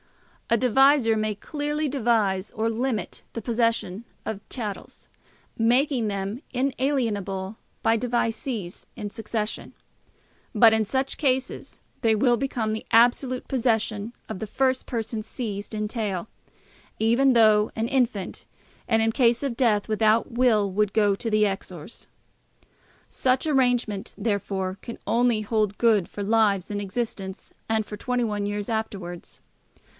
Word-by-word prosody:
A 230 - +4
devisor 255 0 +4
may 215 -1 -1
clearly 295 +6 -2
devise 220 -7 +1
or 225 +1 -1
limit 230 0 -2
the 230 - -4
possession 230 -3 0 0.2
of 210 -2 -4
chattels, 215 -6 -6 0.5
making 245 +1 +2
them 200 +4 -3
inalienable 230 -7 -1 0.3
by 225 - +4
devisees 230 -4 -2
in 210 -3 -5
succession. 220 -1 -4 0.8
But 225 0 +7
in 220 -1 +2
such 265 +5 -1
cases 265 -3 -1 0.2
they 225 -2 +3
will 240 +2 +3
become 235 -3 -1
the 220 - -5
absolute 245 +2 +3
possession 225 -4 0 0.2
of - - -6
the 220 - -4
first 260 +4 0
person 225 -2 -3
seized 210 -2 -5
in 210 0 -2
tail, 210 -4 -3 0.7
even 235 +5 +4
though 215 -2 +5
an 225 +1 -1
infant, 240 -7 -1 0.4
and 225 -1 +3
in 225 - +2
case 240 0 +3
of 270 -4 -1
death 220 -5 +2
without 220 +1 +2
will, 230 -4 +3
would 210 +1 0
go 210 -2 +3
to 230 +3 -4
the 215 -1 +3
Exors. 195 -3 -4 1.0
Such 255 +2 +1
arrangement, 245 -7 +1
therefore, 195 -3 -2
can 235 - -7
only 235 -1 +2
hold 215 -1 0
good 220 -6 +3
for 205 - -5
lives 205 -3 +2
in 205 0 -2
existence 195 -2 -5 0.2
and 220 -1 +1
for 210 - -7
21 215 -3 -1
years 205 0 -3
afterwards. 195 -6 -5
225 Hz, 135 wpm, -25 LUFS, 205-245 Hz, 1.0 s, But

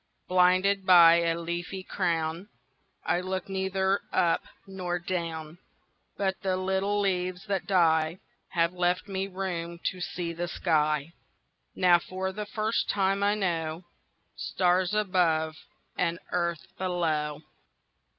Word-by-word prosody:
Blinded 185 +2 +3
by 170 -2 +8
a 165 -1 +1
leafy 175 +3 -4
crownI 165 +1 -1 0.7
looked 185 +1 -4
neither 190 +1 0
up 170 -1 +2 0.2
nor 185 -2 -3
down—But 175 +2 -5
the 190 -2 0
little 190 +2 0
leaves 185 -1 -1
that 195 -3 -2
dieHave 170 -1 +1
left 180 +1 0
me 195 -1 -2
room 175 -3 -4
to 185 - -11
see 175 -1 -3
the 175 +1 -3
sky; 155 -3 0 0.6
Now 175 -1 +5
for 190 +2 -4
the 210 +2 -5
first 215 +1 -1
time 195 0 +1
I 205 +1 +3
knowStars 180 +2 -2
above 170 -6 +1 0.4
and 170 -1 0
earth 170 -2 -1
below. 160 -5 -1
180 Hz, 110 wpm, -28 LUFS, 170-190 Hz, 0.7 s, by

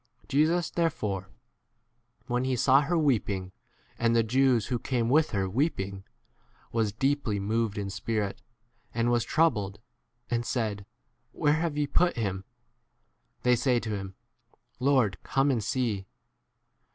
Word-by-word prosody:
Jesus 155 +4 +2
therefore, 105 - -1 1.0
when 125 0 -1
he 130 0 0
saw 130 +3 +5
her 165 +5 0
weeping, 105 - 0 0.5
and 115 0 +2
the 115 - +4
Jews 125 0 +3
who 125 -2 -2
came 120 -3 -1
with 155 +4 +4
her 95 -3 -1
weeping, 100 - -1 0.7
was 110 -3 +1
deeply 130 -2 0
moved 110 +1 -1
h - - -1
in 100 - -4
spirit, 105 -1 -2 0.5
and 115 +1 +2
was 120 -1 +2
34 - - -10
troubled, 110 -12 +2
1 100 - -21 0.5
and 120 0 +1
said, 105 -5 -2 0.5
Where 150 -2 +2
have 155 -1 -1
ye 150 - +2
put 175 +4 +2
him? 95 -4 -2 1.0
They 125 0 +5
say 125 0 +2
to 115 -2 -5
him, 95 -2 -5 0.6
35 - - -25
Lord, 125 -8 +3
come 135 +1 +1
and 115 -5 0
see. 110 -5 -1
115 Hz, 150 wpm, -28 LUFS, 105-135 Hz, 1.0 s, saw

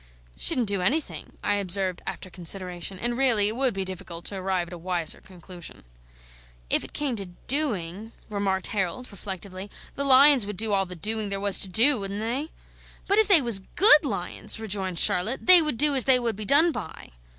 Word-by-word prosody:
"Shouldn't 255 - +1
do 200 -2 -1
anything," 290 - -2
I 205 - +1
observed 190 -2 -1
after 185 - -6
consideration; 180 +1 -4
and 240 +5 -2
really 235 -6 +2
it 220 - -4
would 255 -4 -1
be 195 -1 -3
difficult 180 -2 -9
to 200 - -6
arrive 185 -2 -3
at - - -11
a - - -8
wiser 175 -2 -3
conclusion. 180 - -12 0.9
"If - - +3
it - - -11
came 285 -4 -2
to 195 -2 -6 0.2
DOING," 220 - -2 0.2
remarked 200 -3 -2
Harold, 205 +5 -3
reflectively, 195 0 -8 0.2
"the 280 - -3
lions 275 -3 +6
would 210 -2 -7
do 215 +1 -1
all 195 -1 +2
the 180 - -9
doing 215 +4 -3
there 195 0 -4
was 200 -1 +2
to 195 - +5
do, 240 +7 +3
wouldn't 200 +1 -6
they?" 250 +8 -3 0.6
"But 400 +2 +1
if 440 - +3
they 360 -9 +6
was 235 -5 +2
GOOD 300 - +6
lions," 200 -3 -4
rejoined 190 -4 -3
Charlotte, 185 +11 +1
"they 365 -1 +8
would 300 -7 -2
do 295 +2 +2
as 265 -3 0
they 265 -1 +5
would 235 -3 -3
be 210 +1 -8
done 310 - +4
by." 160 - -9
205 Hz, 195 wpm, -25 LUFS, 185-255 Hz, 0.9 s, they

